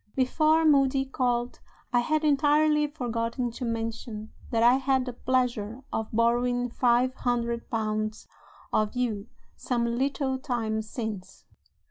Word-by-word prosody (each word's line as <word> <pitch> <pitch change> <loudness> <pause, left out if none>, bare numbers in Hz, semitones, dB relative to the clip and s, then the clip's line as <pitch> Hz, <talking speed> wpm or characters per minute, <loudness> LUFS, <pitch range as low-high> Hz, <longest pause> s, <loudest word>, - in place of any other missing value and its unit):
Before 310 +5 +3
Moody 275 -2 +4
called, 245 -2 -1 0.3
I 245 - +5
had 310 +5 0
entirely 300 +1 +3
forgotten 240 -3 -2
to 240 - -7
mention 225 -1 -4 0.2
that 230 -1 +1
I 245 +2 +6
had 265 -1 +1
the 250 - -5
pleasure 245 -2 -1
of 220 -1 -2
borrowing 245 +2 +1
five 245 +1 +2
hundred 235 -2 -2
pounds 215 -2 -2 0.5
of 215 +2 +1
you 230 -4 -1 0.3
some 240 -2 -1
little 265 +2 -1
time 230 -5 -2
since. 215 -3 -6
245 Hz, 125 wpm, -27 LUFS, 230-265 Hz, 0.5 s, I